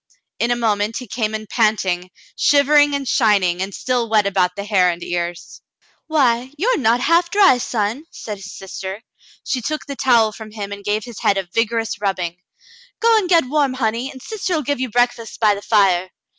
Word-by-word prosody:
In 235 - +1
a 240 - +2
moment 215 -2 0
he 250 - -6
came 220 -1 -2
in 215 0 -5
panting, 195 -6 0 0.3
shivering, 290 0 +4
and 275 -1 -4
shining, 200 -8 +2
and 195 +1 -3
still 245 +2 -2
wet 215 -2 +3
about 185 -2 +1
the 200 - -5
hair 195 -3 +3
and 170 0 -4
ears. 175 0 -5 0.5
"Why, 260 -5 +1
you 405 +11 0
are - - +2
not 240 -1 +2
half 335 +4 +3
dry, 385 -11 +5
son," 230 +5 -2
said 210 -10 -7
his 195 0 -10
sister. 195 +2 -7 0.4
She 260 -2 -1
took 305 +6 -3
the 280 - -6
towel 235 -5 +3
from 220 0 -10
him 205 -2 -6
and 200 0 -7
gave 210 +1 -1
his 240 -2 -9
head 195 - +2
a 190 -2 -3
vigorous 230 -2 -1
rubbing. 180 -4 -2 0.3
" - - -25
Go 460 0 +4
and 405 -5 +1
get 335 -5 +4
warm, 275 -1 0
honey, 235 +1 -1
and 260 - -11
sister'U 360 - -3
give 285 -1 -1
you 260 -1 -2
breakfast 245 0 -1
by 215 -2 +4
the 200 - -6
fire." 190 -4 +2
225 Hz, 200 wpm, -19 LUFS, 200-265 Hz, 0.5 s, dry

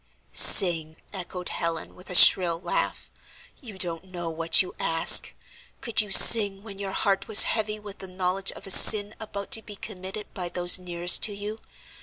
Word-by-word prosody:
"Sing!" 165 -4 +4 0.2
echoed 180 -1 -11
Helen, 165 -1 -9
with 180 - -18
a 180 - -7
shrill 170 -2 +3
laugh, 175 -1 -8 0.5
"you 220 -8 -15
don't 175 -1 -6
know 175 -3 -11
what 165 +2 0
you 185 - -14
ask. 165 0 +1 0.5
Could 220 -3 -4
you 210 - -11
sing 200 -1 +5
when 200 -3 -13
your 195 -1 -9
heart 195 0 -5
was 220 -1 +5
heavy 215 -1 -5
with 205 -2 -16
the 190 - -12
knowledge 185 +1 -5
of - - -17
a 195 - -7
sin 205 +2 +5
about 200 -2 -12
to 225 - -2
be 210 -1 -14
committed 195 0 -12
by 180 -2 -10
those 175 +1 0
nearest 175 -1 -2
to 205 - -3
you? 210 +2 -11
190 Hz, 180 wpm, -20 LUFS, 175-205 Hz, 0.5 s, sing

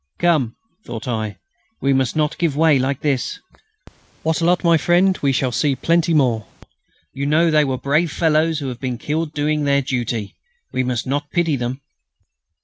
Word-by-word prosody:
"Come!" 155 -10 +1 0.3
thought 115 - -7
I, 110 -4 -3 0.4
"we 135 0 +2
must 130 0 +1
not 150 -1 0
give 165 -5 +1
way 155 -3 +4
like 135 +1 -1
this." 135 -4 -1 0.8
"Wattrelot, 165 +3 +1
my 170 -1 +5
friend, 175 +4 +3
we 140 - +2
shall 130 -1 0
see 140 +2 +1
plenty 170 +3 +1
more. 120 - +2 0.7
You 140 +1 -3
know, 160 +3 +3
they 155 -1 +4
were 130 -2 -1
brave 150 +5 +1
fellows 160 0 +2
who 140 -2 -4
have 125 -1 -7
been 125 -2 -3
killed 155 +4 -2
doing 150 0 0
their 140 -1 +2
duty. 120 -5 -3 0.4
We 130 - +1
must 125 -2 -2
not 145 +2 -2
pity 170 -3 +1
them...." 125 +1 -4
145 Hz, 170 wpm, -20 LUFS, 130-160 Hz, 0.8 s, my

